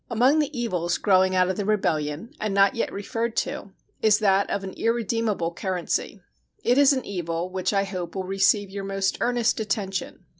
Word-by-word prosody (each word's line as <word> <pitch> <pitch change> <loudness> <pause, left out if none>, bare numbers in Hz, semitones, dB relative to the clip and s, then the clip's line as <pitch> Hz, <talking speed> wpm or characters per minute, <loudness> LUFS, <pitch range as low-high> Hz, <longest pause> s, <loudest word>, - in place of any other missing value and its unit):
Among 255 +6 +3
the 295 -3 -1
evils 180 -7 -1
growing 185 -2 +3
out 185 0 +4
of 190 - -2
the 205 - -1
rebellion, 170 - -1
and 215 -2 -1
not 195 0 +5
yet 230 - -2
referred 225 +3 -3
to, - - -6 0.3
is 215 -2 +5
that 200 -2 +2
of 200 - -2
an 190 - -5
irredeemable 225 -6 -1
currency. 185 0 -3 0.4
It 245 +3 +3
is 285 -1 +6
an 260 -2 -1
evil 175 -2 -3
which 185 -1 -1
I 195 -1 +2
hope 185 -3 -5
will 190 - -2
receive 195 +1 +2
your 200 0 -5
most 195 0 -1
earnest 240 -2 +1
attention. 195 -4 -3
195 Hz, 185 wpm, -25 LUFS, 185-225 Hz, 0.4 s, is